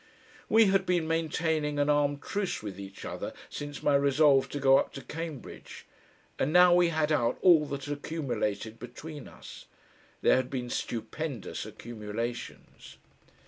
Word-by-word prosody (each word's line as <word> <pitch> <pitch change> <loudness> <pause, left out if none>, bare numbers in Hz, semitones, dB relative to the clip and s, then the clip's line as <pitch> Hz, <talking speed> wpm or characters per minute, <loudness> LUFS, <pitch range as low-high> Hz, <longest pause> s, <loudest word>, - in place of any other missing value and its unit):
We 225 0 +6
had 195 -1 +2
been 175 -3 +1
maintaining 160 -2 0
an 145 0 +2
armed 145 -1 +1
truce 200 - -2
with 100 -2 -6
each 100 0 -9
other - - -5 0.2
since 145 0 -6
my 145 - +3
resolve 140 0 +4
to 145 - -4
go 135 0 +6
up - - -3
to 135 - -8
Cambridge, 160 -2 -8 0.5
and 140 - +1
now 180 +1 +7
we 175 -1 +4
had 155 -1 0
out 120 -5 +1
all 165 -5 +6
that 140 -1 -5
had 145 0 -4
accumulated 120 -8 -3
between 145 +4 -9
us. - - -12 0.6
There - - +5
had 130 -1 -1
been 125 -2 -4
stupendous 120 +2 -4
accumulations.... 115 +1 -7
145 Hz, 150 wpm, -29 LUFS, 125-160 Hz, 0.6 s, now